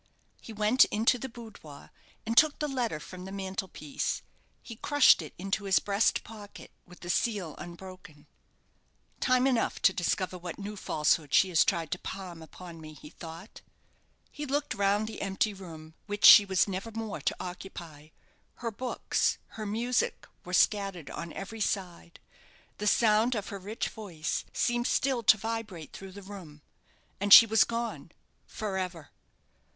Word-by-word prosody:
He - - -10
went 215 +4 +4
into 230 +4 +1
the 265 - -5
boudoir, 220 - -12 0.3
and 225 +1 -2
took 310 +2 +5
the 300 - -2
letter 245 - -2
from 180 +4 -10
the 190 - -8
mantel 190 -1 -4
piece. 150 -5 -4 0.4
He 230 - -10
crushed 290 -6 +5
it 155 - -10
into 195 +3 -3
his 190 -2 +3
breast 200 +2 +1
pocket 210 -2 -12 0.2
with 180 0 -16
the 175 - -8
seal 200 -9 -1
unbroken 175 -4 -11 0.9
"Time 255 0 +3
enough 250 -4 +1
to 195 - +5
discover 180 +1 -1
what 175 -1 -7
new 205 +1 -6
falsehood 150 -5 0
she 190 - +5
has 165 -4 +4
tried 165 -3 -1
to - - -2
palm 180 -4 -7
upon 165 +1 -11
me," 155 0 -10
he 150 +1 -13
thought. 165 +5 -11 0.7
He 295 0 -6
looked 285 +2 -1
round 200 +1 +1
the 220 - -7
empty 200 +2 0
room 160 -5 -11
which 205 0 0
she 205 - +11
was 190 0 +2
never 195 +3 -4
more 225 -2 -5
to - - 0
occupy. 175 -4 -8 0.5
Her 230 -1 -4
books, 250 +4 -1
her 215 -1 -7
music, 235 +4 -1 0.2
were 180 - -9
scattered 195 -3 +1
on 170 -1 -6
every 215 +3 -7
side. 180 -4 -3 0.6
The 210 - -2
sound 220 +3 +3
of 210 -2 -4
her 200 -2 -6
rich 205 +4 -4
voice 175 -9 -4
seemed 240 0 0
still 265 -3 +1
to 215 0 +6
vibrate 215 -6 -5
through 195 -1 -10
the 200 +1 -10
room. 175 -7 -11 0.6
And 200 +1 -2
she 230 - +12
was 220 0 +4
gone 235 0 -4 0.4
for 200 -3 -4
ever! 175 -5 -6
200 Hz, 165 wpm, -29 LUFS, 175-225 Hz, 0.9 s, she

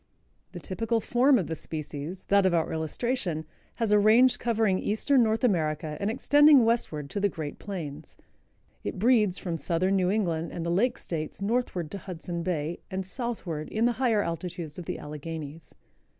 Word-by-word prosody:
The - - -6
typical 225 +4 -1
form 250 +5 +3
of 190 - 0
the 160 - -4
species, 155 +2 -6
that 200 -1 +5
of 175 - +2
our 165 - 0
illustration, 160 - -2 0.3
has 230 -3 -1
a 210 - +6
range 230 +5 +5
covering 220 -5 +1
Eastern 245 +6 +2
North 220 0 +1
America 155 -7 0
and 200 - 0
extending 290 +2 +6
westward 165 -11 0
to - - -2
the 200 0 +2
great 155 -4 -6
plains. 160 -7 -6 0.7
It - - -4
breeds 210 -3 +3
from 170 -3 -3
Southern 180 +6 +1
New 180 -1 +2
England 170 -6 -1
and 170 - -4
the 170 - 0
lake 235 +8 +2
states 155 -3 -5
northward 200 -6 -1
to 200 - -5
Hudson 175 -1 -5
Bay 165 -2 -2
and 190 0 -3
southward 190 - -4
in 220 +2 +1
the 240 - +4
higher 225 -5 +3
altitudes 170 -2 -5
of 175 - -8
the - - -3
Alleghenies. 150 +1 -8
185 Hz, 175 wpm, -27 LUFS, 160-225 Hz, 0.7 s, a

